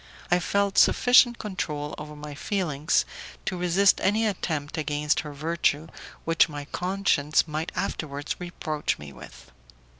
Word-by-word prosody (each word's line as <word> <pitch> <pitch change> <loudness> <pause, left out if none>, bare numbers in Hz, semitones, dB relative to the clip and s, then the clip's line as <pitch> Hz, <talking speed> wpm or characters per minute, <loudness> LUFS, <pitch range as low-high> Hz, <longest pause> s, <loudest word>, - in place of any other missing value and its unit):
I 175 - +5
felt 200 +2 +1
sufficient 245 -1 +6
control 150 -8 -4
over 150 0 -8
my 150 0 -8
own - - -8
feelings 155 -2 0 0.4
to 190 - -1
resist 180 +2 +3
any 215 +4 +2
attempt 160 -8 -2
against 150 -1 0
her 150 - -5
virtue 155 +1 0 0.4
which 165 -1 +4
my 145 -1 -6
conscience 180 -4 +1
might 155 +2 -3
afterwards 150 -6 -3
reproach 155 -4 -3
me 75 -1 -10
with. 65 0 -13
155 Hz, 140 wpm, -26 LUFS, 145-185 Hz, 0.4 s, sufficient